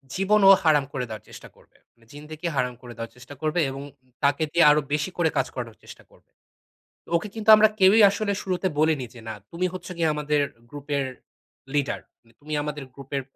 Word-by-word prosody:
জীবন 205 +3 +3
ও - - +11
হারাম 150 -4 +4
করে 125 -2 -2
দেওয়ার 110 -1 -8
চেষ্টা - - -11
করবে। - - -25 0.2
মানে 115 -1 -26
জিন্দেগি 150 +3 -7
হারাম 125 -1 0
করে 120 -1 -10
দেওয়ার 115 0 -7
চেষ্টা 125 +3 -12
করবে 155 +2 0
এবং 135 +1 -6
উম - - -18 0.3
তাকে 145 +2 +2
দিয়ে 170 - +4
আরো 150 0 +3
বেশি 150 +3 0
করে 165 -2 +2
কাজ - - +1
করানোর 115 -3 -6
চেষ্টা - - -13
করবে। - - -25 0.9
ওকে 170 +5 0
কিন্তু 220 -1 -2
আমরা 215 0 +6
কেউই 195 +4 +6
আসলে 200 +1 -1
শুরুতে 185 0 -1
বলিনি 155 -5 +2
যে 120 - -12
"না, - - -4 0.2
তুমি 175 +2 -2
হচ্ছ 185 - -8
কি 170 - -1
আমাদের 150 0 0 0.3
গ্রুপের 145 0 -3 0.7
লিডার। 145 -2 0 0.2
মানে 115 - -26
তুমি 155 +1 -7
আমাদের 150 -1 -5
গ্রুপের 140 0 -5
150 Hz, 200 wpm, -25 LUFS, 135-175 Hz, 0.9 s, ও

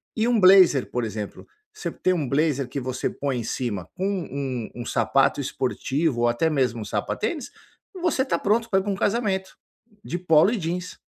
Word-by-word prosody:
E 225 +1 +1
um 240 -2 +3
blazer, 185 -8 +6
por 125 - -1
exemplo, 105 -2 -6 0.3
você 430 - -4
ter 185 - 0
um 155 -7 -2
blazer 140 -2 +1
que 140 - -3
você 130 -1 -2
põe 135 -3 -3
em - - -4
cima, 105 -6 -3
com 185 - -2
um 140 - -3
um 120 - -6
sapato - - +2
esportivo 140 -3 -1
ou 120 - +4
até 120 +8 +1
mesmo 125 -6 0
sapatênis, 220 - -3 0.5
você 335 -7 +2
está 265 - 0
pronto 225 +3 +1
pra 190 - +3
ir 190 - -3
pra 205 - -2
um 195 - -1
casamento, 195 -3 -1 0.5
de 175 - -3
polo 165 +2 +4
e 235 - -1
jeans. 180 +2 -4
160 Hz, 190 wpm, -24 LUFS, 125-195 Hz, 0.5 s, blazer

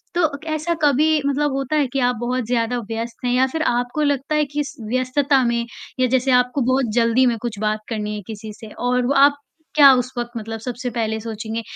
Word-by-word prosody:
तो 345 -2 +3
क 315 - -16
ऐसा 310 +3 -1
कभी 300 +2 +3
मतलब 285 +1 +1
होता 275 +2 -2
है 295 -2 +3
कि 275 - 0
आप 245 0 +2
बहुत 245 0 -2
ज़्यादा 235 0 0
व्यस्त 230 +2 -5
हैं 245 - +1
या 255 +1 +4
फ़िर 320 +4 -4
आपको 245 +2 0
लगता 285 0 0
है 300 -1 +2
कि 290 +1 -2
स - - -9
व्यस्तता 260 +2 +2
में, 235 0 0 0.3
या 255 - +3
जैसे 260 +1 +1
आपको 250 +2 +2
बहुत 255 -2 +1
जल्दी 235 +2 +3
में 235 -2 +1
कुछ 225 -4 -4
बात 215 0 0
करनी 210 -2 -3
है 210 - -5
किसी 215 0 -7
से। 220 - -12
और 250 0 0
व 280 - +2
आप 285 +1 +5 0.4
क्या 280 -2 +9
उस 250 0 -1
वक़्त 240 0 -3
मतलब 225 0 -5
सबसे 245 +2 -4
पहले 220 -2 -2
सोचेंगे, 225 0 -5
250 Hz, 225 wpm, -21 LUFS, 230-280 Hz, 0.4 s, क्या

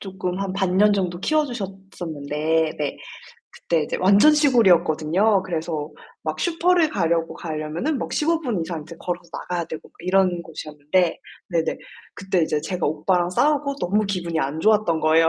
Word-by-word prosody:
쪼끔 185 -2 -4
한 195 -1 -2
반 190 -2 0
년 210 +2 +5
정도 180 -3 -1
키워 310 +4 +2
주셨었는데 165 - -3
네. 145 -2 -2 0.6
그때 165 -2 0
이제 - - -3
완전 200 +11 +6
시골이었거든요. 195 - +3
그래서 160 -4 -3 0.3
막 - - -3
슈퍼를 345 -1 +2
가려고 165 - 0
가려면은 160 - -3
막 - - -4
15 325 +2 +1
분 240 - -2
이상 165 -2 -5
이제 165 +2 -11
걸어서 175 -1 -5
나가야 175 0 -3
되고 160 - -8
그 - - -49
이런 185 -2 +2
곳이었는데 155 +2 -1 0.3
네네. 165 -2 0 0.4
그때 190 -2 -1
인제 155 -2 0
제가 180 -2 -2
오빠랑 175 +4 +1
싸우고 285 +6 +1
너무 210 -1 0
기분이 175 -4 -2
안 140 +2 -2
좋았던 210 -4 +2
거예요. 160 +1 +4
180 Hz, 355 characters per minute, -23 LUFS, 160-205 Hz, 0.6 s, 완전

